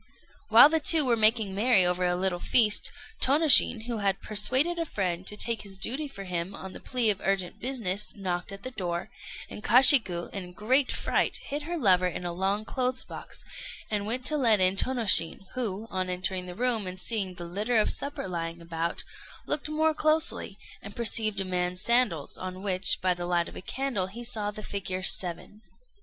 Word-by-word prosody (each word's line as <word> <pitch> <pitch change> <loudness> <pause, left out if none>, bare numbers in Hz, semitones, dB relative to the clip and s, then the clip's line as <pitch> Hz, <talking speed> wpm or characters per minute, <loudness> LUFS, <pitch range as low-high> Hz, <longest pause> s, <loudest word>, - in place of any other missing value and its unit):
While 230 +5 +8
the 320 +1 0
two 310 0 +4
were 240 -2 +2
making 220 -2 +2
merry 205 -2 +3
over 180 0 0
a 175 - 0
little 180 -1 -2
feast, 215 +2 +4 0.3
Tônoshin, 275 -5 +5
who 235 -2 -4
had 195 -1 0
persuaded 260 +11 0
a - - 0
friend 185 - -4
to 210 - -3
take 230 0 -1
his 195 -2 -9
duty 265 +10 -1
for 200 -8 -10
him 180 0 -5
on 190 0 -10
the - - -10
plea 245 -4 +1
of 195 - -6
urgent 195 -2 -2
business, 210 -6 -2
knocked 185 -2 -4
at 195 0 -10
the 255 - -6
door, 180 -2 -5 0.4
and 210 - -11
Kashiku, 235 - +5
in 195 - -5
a 180 - -12
great 255 +8 +1
fright, - - -1
hid 290 +2 -5
her 345 - -3
lover 185 - +3
in 180 0 -6
a 175 - -4
long 195 +4 -2
clothes 255 +1 -3
box, - - -8 0.5
and 205 -1 -2
went 250 +3 -2
to 305 - +1
let 230 -7 +3
in 185 +1 +3
Tônoshin, 225 -7 +3
who, 225 -4 -3
on 185 -1 -3
entering 180 0 -3
the 180 - -9
room 230 -3 +1
and 185 0 -6
seeing 195 -2 -2
the 175 - -8
litter 210 +7 -2
of 215 - +3
the - - +3
supper 280 -8 -4
lying 170 -1 -5
about, 165 0 -4 0.4
looked 300 0 -2
more 315 +1 +1
closely, 310 -9 0 0.2
and 200 0 -11
perceived 220 -3 +1
a 195 - -2
man's 180 0 -3
sandals, 235 - +1
on 185 +1 -7
which, 185 -2 +5
by 185 -1 +2
the 175 0 -6
light 175 -1 0
of - - -12
a - - -8
candle, 245 -4 -3
he 230 +5 -10
saw 215 -3 -3
the 215 +1 -9
figure 190 -2 -5
seven. 185 +3 -2
205 Hz, 200 wpm, -27 LUFS, 185-245 Hz, 0.5 s, While